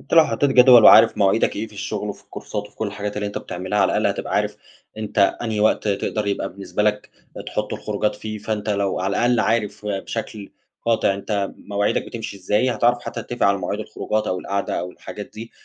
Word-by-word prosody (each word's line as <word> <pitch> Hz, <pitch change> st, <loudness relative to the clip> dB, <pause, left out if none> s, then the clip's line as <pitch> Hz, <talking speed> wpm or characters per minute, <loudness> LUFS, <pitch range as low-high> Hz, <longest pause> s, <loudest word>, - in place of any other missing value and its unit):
أنت -, -, -3 dB
لو 165 Hz, -1 st, +8 dB
حطيت 135 Hz, +5 st, +1 dB
جدول 125 Hz, -3 st, +8 dB
وعارف -, -, +8 dB
مواعيدك 100 Hz, +3 st, +2 dB
إيه 110 Hz, +2 st, -3 dB
في 110 Hz, -, -18 dB
الشغل 100 Hz, -, -4 dB
وفي -, -, -8 dB
الكورسات 105 Hz, -1 st, -6 dB
وفي -, -, -23 dB
كل 110 Hz, -, -2 dB
الحاجات 105 Hz, 0 st, -5 dB
اللي 105 Hz, -, -2 dB
أنت 100 Hz, -, -4 dB
بتعملها، 95 Hz, +4 st, -4 dB
على -, -, +3 dB
الأقل -, -, +2 dB
هتبقى -, -, -2 dB
عارف -, -, 0 dB, 0.4 s
أنت 105 Hz, -1 st, -4 dB, 0.2 s
أنهي 110 Hz, -3 st, -2 dB
وقت 110 Hz, 0 st, +2 dB
تقدر 105 Hz, +1 st, -1 dB
يبقى 100 Hz, -, -1 dB
بالنسبة 100 Hz, +2 st, -3 dB
لك 105 Hz, 0 st, 0 dB, 0.4 s
تحط 105 Hz, 0 st, -3 dB
الخروجات 105 Hz, 0 st, -2 dB
فيه، 110 Hz, 0 st, -6 dB
فأنت 105 Hz, 0 st, -3 dB
لو 100 Hz, -2 st, 0 dB
على 95 Hz, +2 st, -1 dB
الأقل 120 Hz, -1 st, +3 dB
عارف 105 Hz, -1 st, -1 dB
بشكل 105 Hz, +1 st, -5 dB, 0.3 s
قاطع 110 Hz, -4 st, +2 dB
أنت 100 Hz, 0 st, -2 dB
مواعيدك 100 Hz, 0 st, -1 dB
بتمشي 115 Hz, -3 st, -6 dB
إزاي، 105 Hz, +7 st, +1 dB
هتعرف 120 Hz, 0 st, +2 dB
حتّى -, -, -5 dB
تتفق 120 Hz, -4 st, -1 dB
على 100 Hz, 0 st, +3 dB
مواعيد 90 Hz, -, -3 dB
الخروجات 110 Hz, 0 st, -2 dB
أو 90 Hz, -, -1 dB
القعدة 100 Hz, 0 st, -2 dB
أو 90 Hz, -, -5 dB
الحاجات 105 Hz, +2 st, -9 dB
دي 115 Hz, +2 st, -8 dB
105 Hz, 205 wpm, -22 LUFS, 100-110 Hz, 0.4 s, لو